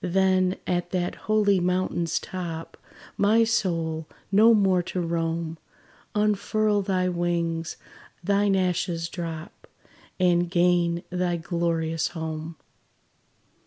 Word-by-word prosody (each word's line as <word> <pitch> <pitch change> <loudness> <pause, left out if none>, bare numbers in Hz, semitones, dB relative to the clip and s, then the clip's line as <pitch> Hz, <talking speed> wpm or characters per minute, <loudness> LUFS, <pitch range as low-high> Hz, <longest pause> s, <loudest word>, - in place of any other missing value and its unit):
Then 185 0 +2
at 175 -1 -1
that 180 -1 -1
holy 210 -3 +2
mountain's 180 -2 0
top, 165 -3 -6 0.4
My 220 +3 +4
soul, 165 -8 -1 0.2
no 215 +4 +6
more 190 -3 +3
to 180 +1 -4
roam, 165 -1 -2 0.6
Unfurl 210 0 +1
thy 185 -2 0
wings 170 -2 -1 0.5
thine 200 +1 +2
ashes 175 -2 0
drop; 165 -2 -7 0.5
And 175 -1 +3
gain 175 -1 +2
thy 180 -1 0
glorious 165 -1 -1
home. 160 0 -5
175 Hz, 100 wpm, -25 LUFS, 165-190 Hz, 0.6 s, no